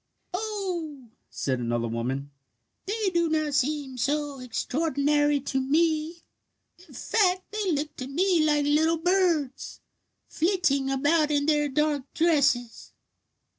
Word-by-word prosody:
"Oh," 360 Hz, -, -4 dB, 0.2 s
said 130 Hz, -2 st, -2 dB
another 120 Hz, -1 st, -1 dB
woman, 130 Hz, +5 st, -3 dB, 0.6 s
"they 415 Hz, -1 st, -1 dB
do 340 Hz, -1 st, +2 dB
not 310 Hz, -2 st, 0 dB
seem 275 Hz, -2 st, -1 dB
so 290 Hz, +2 st, -1 dB
extraordinary 290 Hz, +3 st, 0 dB
to 265 Hz, 0 st, -2 dB
me. 315 Hz, +3 st, 0 dB, 0.6 s
In -, -, -18 dB
fact, 370 Hz, -, +1 dB
they 420 Hz, -3 st, -1 dB
look 300 Hz, 0 st, -2 dB
to 255 Hz, -, -5 dB
me 340 Hz, +3 st, +2 dB
like 295 Hz, -1 st, +2 dB
little 315 Hz, +3 st, +2 dB
birds, 335 Hz, -6 st, 0 dB, 0.5 s
flitting 320 Hz, -6 st, +1 dB
about 295 Hz, +3 st, +2 dB
in 290 Hz, -1 st, +1 dB
their 295 Hz, -1 st, +2 dB
dark 290 Hz, -1 st, -1 dB
dresses." 280 Hz, -8 st, +1 dB
300 Hz, 120 wpm, -26 LUFS, 270-335 Hz, 0.6 s, do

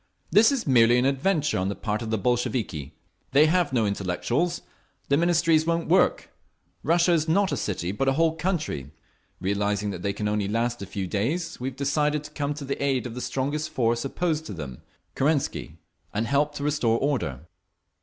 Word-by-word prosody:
"This 220 Hz, +6 st, +6 dB
is 270 Hz, -4 st, -1 dB
merely 120 Hz, -3 st, +5 dB
an 125 Hz, -, +2 dB
adventure 145 Hz, -, +1 dB
on 95 Hz, +1 st, 0 dB
the 100 Hz, -, -3 dB
part 105 Hz, 0 st, -2 dB
of 115 Hz, -, -4 dB
the 110 Hz, -, 0 dB
Bolsheviki. 105 Hz, -, -1 dB, 0.4 s
They 145 Hz, +3 st, +7 dB
have 170 Hz, -1 st, +2 dB
no 120 Hz, -4 st, +2 dB
intellectuals…. 105 Hz, -, -1 dB, 0.5 s
The 140 Hz, -, +4 dB
Ministries 165 Hz, -1 st, +3 dB
won't 170 Hz, -1 st, 0 dB
work…. 180 Hz, +2 st, +3 dB, 0.5 s
Russia 170 Hz, +2 st, +3 dB
is 160 Hz, -1 st, +1 dB
not 190 Hz, +3 st, +2 dB
a -, -, +1 dB
city, 95 Hz, -6 st, -2 dB
but 120 Hz, +7 st, -1 dB
a 135 Hz, -, +4 dB
whole 160 Hz, +2 st, +2 dB
country…. 155 Hz, -, -2 dB, 0.5 s
Realising 100 Hz, +2 st, -1 dB
that 90 Hz, -, -6 dB
they 100 Hz, -, 0 dB
can 105 Hz, +1 st, -3 dB
only 105 Hz, -1 st, 0 dB
last 115 Hz, +2 st, -1 dB
a 100 Hz, -, -6 dB
few 100 Hz, 0 st, -4 dB
days, 145 Hz, -, -2 dB
we 125 Hz, -, -3 dB
have 130 Hz, -, -13 dB
decided 150 Hz, +1 st, 0 dB
to 150 Hz, -, -10 dB
come 145 Hz, -1 st, -2 dB
to 145 Hz, -1 st, -7 dB
the 140 Hz, +1 st, -3 dB
aid 135 Hz, -3 st, +1 dB
of 120 Hz, -, -5 dB
the 125 Hz, -, -5 dB
strongest 145 Hz, +5 st, -2 dB
force 120 Hz, -1 st, 0 dB
opposed 160 Hz, +2 st, -1 dB
to -, -, -6 dB
them—Kerensky—and 100 Hz, -, -4 dB
help 145 Hz, +3 st, +1 dB
to 140 Hz, -, -4 dB
restore 140 Hz, -6 st, +1 dB
order." 100 Hz, -, -1 dB
135 Hz, 185 wpm, -25 LUFS, 105-155 Hz, 0.5 s, They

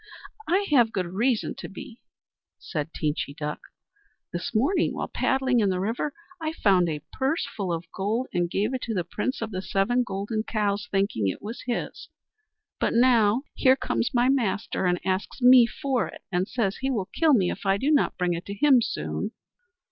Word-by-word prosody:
"I 385 Hz, +4 st, +2 dB
have 240 Hz, -6 st, +5 dB
good 185 Hz, -4 st, -1 dB
reason 215 Hz, +7 st, 0 dB
to -, -, -7 dB
be," 225 Hz, +4 st, -10 dB, 0.6 s
said 150 Hz, -2 st, -4 dB
Teenchy 150 Hz, -2 st, -2 dB
Duck. 150 Hz, 0 st, -4 dB, 0.7 s
"This 175 Hz, +1 st, -3 dB
morning, 330 Hz, -, +2 dB
while -, -, -3 dB
paddling 265 Hz, -2 st, +1 dB
in 205 Hz, -3 st, +3 dB
the 185 Hz, -1 st, 0 dB
river, 230 Hz, +9 st, -1 dB, 0.3 s
I 315 Hz, 0 st, -2 dB
found 185 Hz, -, +3 dB
a 150 Hz, -2 st, -4 dB
purse 270 Hz, +5 st, 0 dB
full 195 Hz, -4 st, -2 dB
of 165 Hz, 0 st, -3 dB
gold, 215 Hz, +6 st, -1 dB
and 175 Hz, -1 st, 0 dB
gave 210 Hz, +8 st, 0 dB
it 260 Hz, -, -2 dB
to 225 Hz, -, -3 dB
the 180 Hz, -, 0 dB
Prince 215 Hz, +8 st, -3 dB
of 225 Hz, -, -5 dB
the 185 Hz, -1 st, -3 dB
Seven 220 Hz, +5 st, +1 dB
Golden 205 Hz, 0 st, -2 dB
Cows, 210 Hz, 0 st, -1 dB
thinking 195 Hz, -, 0 dB
it 95 Hz, -, -2 dB
was 220 Hz, +3 st, -6 dB
his. 240 Hz, -, -4 dB, 0.7 s
But -, -, +1 dB
now, 235 Hz, -1 st, +4 dB
here 260 Hz, 0 st, +4 dB
comes 240 Hz, -, -1 dB
my 245 Hz, 0 st, +3 dB
master 215 Hz, -7 st, 0 dB
and 180 Hz, 0 st, +1 dB
asks 190 Hz, +5 st, -2 dB
me 250 Hz, -1 st, +7 dB
for 260 Hz, +1 st, -1 dB
it, -, -, -11 dB
and 180 Hz, +1 st, 0 dB
says 210 Hz, -6 st, -1 dB
he 265 Hz, -, -2 dB
will 220 Hz, -8 st, -1 dB
kill 320 Hz, -4 st, +4 dB
me 185 Hz, -6 st, +2 dB
if -, -, -7 dB
I 195 Hz, 0 st, +3 dB
do 275 Hz, +9 st, +1 dB
not 295 Hz, -, +2 dB
bring 180 Hz, -1 st, +1 dB
it 170 Hz, +2 st, -5 dB
to 200 Hz, -, -5 dB
him 265 Hz, +2 st, +5 dB
soon." -, -, -3 dB
215 Hz, 195 wpm, -26 LUFS, 185-255 Hz, 0.7 s, me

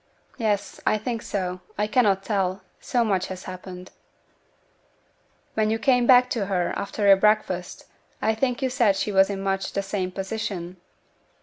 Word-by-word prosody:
'Yes, 210 Hz, -3 st, -1 dB
I 215 Hz, -, +2 dB
think 225 Hz, +1 st, -3 dB
so; 185 Hz, -3 st, -3 dB, 0.2 s
I 210 Hz, -, +1 dB
cannot 210 Hz, -3 st, +2 dB
tell, 195 Hz, -2 st, -1 dB, 0.2 s
so 240 Hz, -1 st, 0 dB
much 190 Hz, -4 st, 0 dB
has 185 Hz, 0 st, -7 dB
happened.' 185 Hz, 0 st, -9 dB, 1.6 s
'When 215 Hz, -1 st, +1 dB
you 220 Hz, -, +1 dB
came 245 Hz, 0 st, +2 dB
back 250 Hz, -1 st, +7 dB
to 205 Hz, -5 st, -1 dB
her, 180 Hz, -3 st, 0 dB
after 200 Hz, +1 st, -3 dB
your 195 Hz, -1 st, +8 dB
breakfast, 195 Hz, -3 st, 0 dB, 0.3 s
I 220 Hz, -, +1 dB
think 250 Hz, +3 st, -1 dB
you 260 Hz, -, +2 dB
said 235 Hz, -7 st, +3 dB
she 210 Hz, -, -1 dB
was 195 Hz, 0 st, +4 dB
in 195 Hz, -1 st, -4 dB
much 195 Hz, 0 st, -1 dB
the 200 Hz, -, -1 dB
same 195 Hz, -1 st, -2 dB
position?' 190 Hz, -2 st, -4 dB
200 Hz, 165 wpm, -24 LUFS, 190-220 Hz, 1.6 s, your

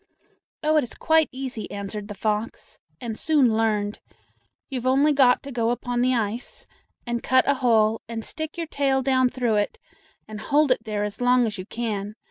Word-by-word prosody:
"Oh, 310 Hz, +1 st, +3 dB
it 300 Hz, -, +3 dB
is 245 Hz, -, -7 dB
quite 320 Hz, -1 st, +3 dB
easy," 260 Hz, -4 st, -6 dB
answered 200 Hz, +1 st, -6 dB
the 205 Hz, -, -7 dB
fox, 215 Hz, +2 st, -3 dB, 0.2 s
"and 235 Hz, -3 st, -5 dB
soon 270 Hz, -5 st, +3 dB
learned. 210 Hz, -2 st, 0 dB, 0.7 s
You've 255 Hz, -2 st, -3 dB
only 280 Hz, +3 st, +4 dB
got 260 Hz, -3 st, +4 dB
to 280 Hz, -, -8 dB
go 230 Hz, -2 st, 0 dB
upon 245 Hz, 0 st, -1 dB
the 255 Hz, +1 st, +2 dB
ice, 225 Hz, +1 st, -3 dB, 0.4 s
and 240 Hz, -1 st, -2 dB
cut 260 Hz, +1 st, +3 dB
a 280 Hz, -, +5 dB
hole 225 Hz, -2 st, +3 dB
and 225 Hz, -1 st, -5 dB
stick 315 Hz, +1 st, -6 dB
your 335 Hz, -, -2 dB
tail 275 Hz, -3 st, 0 dB
down 260 Hz, -1 st, +3 dB
through 240 Hz, -4 st, 0 dB
it, 205 Hz, -, -1 dB, 0.5 s
and 215 Hz, -1 st, -8 dB
hold 290 Hz, +2 st, +2 dB
it 230 Hz, -2 st, +1 dB
there 210 Hz, -1 st, -2 dB
as 210 Hz, +3 st, -5 dB
long 245 Hz, 0 st, +4 dB
as 210 Hz, -3 st, -4 dB
you 185 Hz, -, -7 dB
can. 215 Hz, -3 st, -4 dB
240 Hz, 190 wpm, -24 LUFS, 215-265 Hz, 0.7 s, a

